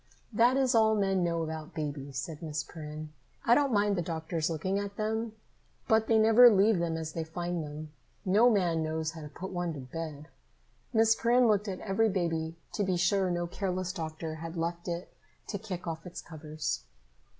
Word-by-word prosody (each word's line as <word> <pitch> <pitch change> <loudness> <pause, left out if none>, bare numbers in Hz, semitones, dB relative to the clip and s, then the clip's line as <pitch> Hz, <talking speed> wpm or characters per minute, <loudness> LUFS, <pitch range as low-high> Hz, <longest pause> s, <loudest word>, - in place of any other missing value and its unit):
"That 240 +4 +4
is 265 -1 +3
all 220 -1 +5
men 195 -3 +1
know 170 -1 0
about 160 -1 -6
babies," 145 -3 -4
said 150 +3 -5
Miss 155 -2 -3
Perrin. 155 -1 -8 0.3
"I 235 - +6
don't 280 +1 +3
mind 205 -2 +3
the 175 - 0
doctors 160 -1 -2
looking 185 +5 -1
at 200 0 -5
them, 220 +1 -1 0.5
but 220 0 +3
they 225 - +4
never 225 +3 +8
leave 205 -2 +4
them 165 -1 -1
as 160 -1 -5
they 165 - -2
find 175 +1 -3
them. 150 +1 -7 0.3
No 210 +6 +5
man 175 -7 +2
knows 160 0 -1
how 165 -1 -9
to 150 - -8
put 185 +5 -7
one 175 -2 -2
to - - -6
bed." 150 +2 -6 0.6
Miss 225 -1 +5
Perrin 240 +2 +3
looked 210 -1 +2
at 190 -2 -4
every 220 +2 +2
baby 165 -4 -1 0.2
to 205 - 0
be 185 -2 +1
sure 185 +2 +2
no 175 0 -1
careless 185 0 -2
doctor 160 -2 -5
had 165 +2 -6
left 170 +1 -3
it 175 +1 -4 0.4
to 200 - -3
kick 185 -4 -6
off 165 -1 -4
its 180 - -7
covers. 155 - -4
175 Hz, 195 wpm, -30 LUFS, 160-205 Hz, 0.6 s, never